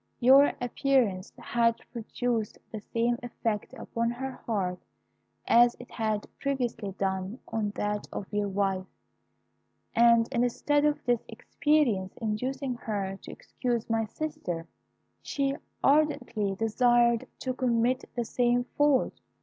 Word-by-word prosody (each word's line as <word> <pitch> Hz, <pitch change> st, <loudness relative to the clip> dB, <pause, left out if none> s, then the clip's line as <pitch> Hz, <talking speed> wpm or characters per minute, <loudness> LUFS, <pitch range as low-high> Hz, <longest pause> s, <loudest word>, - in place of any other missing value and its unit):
Your 270 Hz, +3 st, +7 dB
appearance 245 Hz, -6 st, +1 dB
had 230 Hz, -1 st, +2 dB, 0.2 s
produced 235 Hz, -1 st, -2 dB
the 215 Hz, -, -6 dB
same 235 Hz, +1 st, +1 dB
effect 225 Hz, -3 st, -3 dB
upon 230 Hz, 0 st, -2 dB
her 265 Hz, +3 st, -4 dB, 0.2 s
heart 185 Hz, -5 st, -1 dB, 0.7 s
as 240 Hz, +1 st, +6 dB
it 245 Hz, -, -11 dB
had 215 Hz, -2 st, -1 dB
previously 245 Hz, -7 st, -2 dB
done 190 Hz, +3 st, -2 dB
on 215 Hz, -2 st, -1 dB
that 210 Hz, 0 st, -2 dB
of 200 Hz, -, -4 dB
your 205 Hz, 0 st, +1 dB
wife, 190 Hz, -1 st, 0 dB, 1.1 s
and 235 Hz, -1 st, +5 dB
instead 270 Hz, +4 st, +1 dB
of 300 Hz, 0 st, 0 dB
this 240 Hz, -2 st, +1 dB
experience 235 Hz, -5 st, +1 dB
inducing 250 Hz, +4 st, -2 dB
her 200 Hz, -4 st, -3 dB
to -, -, -9 dB
excuse 235 Hz, -3 st, -3 dB
my 225 Hz, 0 st, +2 dB
sister, 215 Hz, -, -4 dB, 0.5 s
she 275 Hz, -1 st, -1 dB, 0.3 s
ardently 260 Hz, -9 st, +2 dB
desired 235 Hz, +2 st, +3 dB
to 255 Hz, -, -3 dB
commit 250 Hz, 0 st, +1 dB
the 240 Hz, -1 st, -1 dB
same 245 Hz, +1 st, +2 dB, 0.2 s
fault. 290 Hz, -3 st, +3 dB
235 Hz, 120 wpm, -28 LUFS, 210-255 Hz, 1.1 s, Your